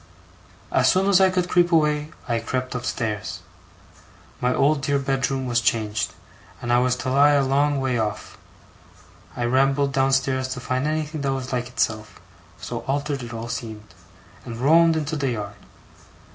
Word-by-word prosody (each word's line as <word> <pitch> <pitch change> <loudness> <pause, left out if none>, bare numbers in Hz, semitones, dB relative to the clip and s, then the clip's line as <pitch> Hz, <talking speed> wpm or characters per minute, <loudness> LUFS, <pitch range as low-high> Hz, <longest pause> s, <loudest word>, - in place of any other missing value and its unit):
As - - +4
soon 190 +1 +2
as 195 -1 +5
I 190 - +6
could 180 -1 0
creep 175 -1 +3
away, 150 -2 +2 0.2
I 115 -2 0
crept 130 +2 -3
upstairs. 115 -4 -3 1.0
My 125 0 +1
old 140 +3 +2
dear 145 +1 +1
bedroom 135 -1 -1
was 120 -1 +1
changed, 110 -3 0 0.5
and 120 0 -1
I 120 - +5
was 125 0 +2
to 125 +1 -3
lie 145 +2 +5
a 140 -1 +3
long 140 +1 +2
way 130 -3 0
off. 105 -1 -3 1.0
I 120 - -1
rambled 135 +3 +2
downstairs 135 -1 +1
to - - -6
find 130 +2 -1
anything 155 0 -2
that 140 -1 0
was 130 -1 -4
like 120 -1 -1
itself, 110 -3 -2 0.4
so - - -5
altered 140 0 -1
it 120 -1 -7
all 115 0 -6
seemed; 110 -4 -7 0.5
and 115 -2 -7
roamed 165 +6 +5
into 155 0 -2
the 140 -3 -1
yard. 105 -4 -4
130 Hz, 165 wpm, -23 LUFS, 120-145 Hz, 1.0 s, I